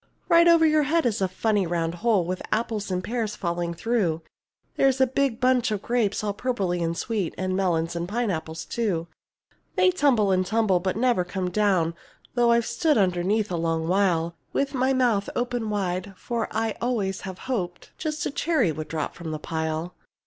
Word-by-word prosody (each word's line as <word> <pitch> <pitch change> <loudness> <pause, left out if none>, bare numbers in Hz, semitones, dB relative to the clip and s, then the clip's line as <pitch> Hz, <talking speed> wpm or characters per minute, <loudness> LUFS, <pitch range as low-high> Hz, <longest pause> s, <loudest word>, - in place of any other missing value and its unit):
Right 335 0 +6
over 335 -1 +6
your 310 -1 +4
head 330 -1 +2
is 225 -3 0
a 190 - +3
funny 200 +1 0
round 165 -1 -1
hole 215 -6 +3
With 185 +1 -3
apples 220 -3 -1
and 185 -1 -1
pears 225 -2 -2
falling 170 -1 -2
through; 180 -7 0 0.5
There's 270 -1 +3
a 265 - +6
big 260 -2 0
bunch 255 -2 +3
of 210 -2 -3
grapes 225 -4 0
all 205 -1 -1
purply 200 -6 -1
and 165 0 -1
sweet, 210 -7 -2
And 185 0 -1
melons 170 -3 0
and 170 +1 -3
pineapples 165 -8 -2
too. 195 -8 -1 0.7
They 370 -1 +4
tumble 255 - +3
and 185 0 +3
tumble, 210 -2 +2
but 185 +2 -2
never 235 -6 +2
come 180 0 -3
down 185 -5 +2 0.4
Though 240 -1 +3
I've 235 -1 +3
stood 300 +4 +1
underneath 195 +2 +1
a 175 - -1
long 165 -1 -1
while 175 -3 +2 0.2
With 275 0 0
my 260 0 +2
mouth 240 -6 +2
open 245 -2 -1
wide, 195 -1 -2
for 235 -2 -2
I 225 0 -2
always 210 -6 -1
have 190 -1 -7
hoped 185 -9 -4
Just 310 -1 -2
a - - -1
cherry 285 - +1
would 155 0 -5
drop 155 -2 -3
from 170 -2 -7
the 155 - -3
pile. 160 +2 -3
205 Hz, 185 wpm, -25 LUFS, 175-240 Hz, 0.7 s, Right